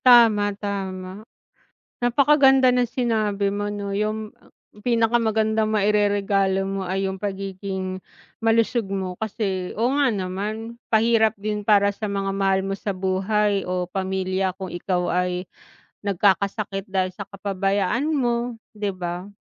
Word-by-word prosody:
Tama, 230 -4 +7
tama. 190 -1 -5 0.8
Napakaganda 265 +1 +5
ng 245 -1 +2
sinabi 215 -5 0
mo 205 0 -2
'no, 205 -1 -4
'yung 215 +1 -2 0.5
pinakamagandang 220 -1 +2
maireregalo 200 -2 +2
mo 195 0 -3
ay 190 +1 -1
'yung 190 0 -3
pagiging 190 -1 -4 0.4
malusog 225 -1 +2
mo, 190 -2 -4
kasi 195 -4 -3
oo 235 +4 +1
nga 280 - +4
naman, 215 +3 -4
pahirap 220 -1 +3
din 210 +1 -3
para 205 -1 +4
sa 215 +1 -5
mga 195 -1 -1
mahal 195 -1 +1
mo 195 - -2
sa 195 0 -3
buhay 195 +2 0
o 180 0 0
pamilya 190 -1 -1
kung 190 -2 -6
ikaw 180 0 -1
ay 180 0 0 0.6
nagkakasakit 200 +1 0
dahil 185 -1 0
sa 200 +2 -8
kapabayaan 195 +5 -1
mo, 240 -5 0 0.2
'di 205 -3 -3
ba? 175 +1 -4
200 Hz, 125 wpm, -23 LUFS, 190-220 Hz, 0.8 s, Tama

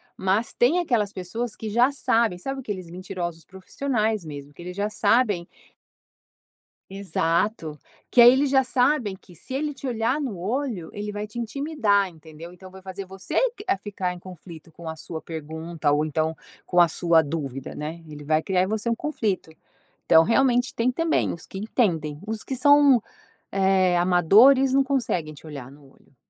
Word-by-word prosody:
mas 195 +5 0
tem 260 +9 +3
aquelas 235 - 0
pessoas 215 +5 -5
que 220 - -7
já 240 +5 +4
sabem, 235 -7 +1
sabe 270 +9 -5
aqueles 200 -8 -6
mentirosos 175 -2 -6
profissionais 215 - -2
mesmo, 145 -2 -9
que 175 - -13
eles 180 +2 -8
já 205 +1 -1
sabem 210 -8 +2 1.4
Exato, 170 -3 -1 0.3
que - - +2
aí 240 +1 +10
eles 275 +2 +2
já 265 -1 +4
sabem, 250 -5 +1
que 185 - -18
se 175 +10 -9
ele 295 +2 -2
te 275 0 -7
olhar 235 +3 0
no 255 -10 -4
olho 215 - -3
ele 210 0 -5
vai 205 0 -4
te 215 +3 -8
intimidar, 230 -6 0
entendeu? 160 0 -12
Então 185 +1 -13
vai 190 +1 -13
fazer 190 +1 -7
você 190 0 -8 0.2
q 465 - -12
a - - +2
ficar 190 -2 -4
em 180 - -11
conflito 170 -3 -12
com 165 0 -8
a 160 - -5
sua 160 0 -7
pergunta 160 0 -4
ou 145 +1 +2
então 155 +1 -1 0.3
com 175 -1 +3
a 170 - +6
sua 170 0 +3
dúvida, 140 -4 -5
né. 160 +3 -6
Ele 150 -1 -10
vai 155 +1 +2
criar 185 +1 +1
em - - -1
você 220 +2 -2
um 230 - +1
conflito. 220 - -2 0.6
Então 160 - +7
realmente 245 +4 +2
tem 240 +2 +1
também 330 +4 0
os 170 - -7
que 190 - -8
entendem, 170 - -1
os 215 0 -4
que 265 - -4
são, 280 -2 +5 0.5
eh, 190 -2 +3
amadores 210 +10 +5
não 275 0 +4
conseguem 235 - -1
te 145 - -15
olhar 140 -5 -8
no 145 +1 -17
olho. 135 - -27
195 Hz, 180 wpm, -24 LUFS, 165-240 Hz, 1.4 s, aí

